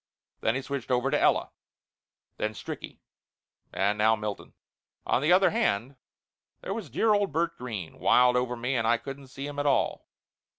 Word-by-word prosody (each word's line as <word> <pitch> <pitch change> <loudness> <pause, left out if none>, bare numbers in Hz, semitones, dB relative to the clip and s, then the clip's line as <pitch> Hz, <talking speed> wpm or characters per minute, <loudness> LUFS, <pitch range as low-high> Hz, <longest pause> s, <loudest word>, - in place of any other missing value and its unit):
Then 110 - +1
he 130 - -2
switched 140 -2 -5
over 125 +2 +1
to - - +2
Ella. - - +2 0.9
Then 105 0 -2
Stricky. - - -7 0.7
And 100 +2 0
now 110 +1 +5
Milton. 105 -2 -6 0.5
On - - +2
the 155 +4 +2
other 190 +2 +5
hand, 135 - 0 0.7
there 195 - -4
was 225 +1 -6
dear 220 -1 +2
old 205 -4 +1
Bert 165 +3 0
Green, 110 -9 -7
wild 125 0 +5
over 125 0 0
me 125 +3 -2
and 115 -3 +1
I 120 - +4
couldn't 135 +2 -9
see 135 +2 -7
him 145 0 -5
at 145 - 0
all. 140 - +1
130 Hz, 175 wpm, -28 LUFS, 115-145 Hz, 0.9 s, now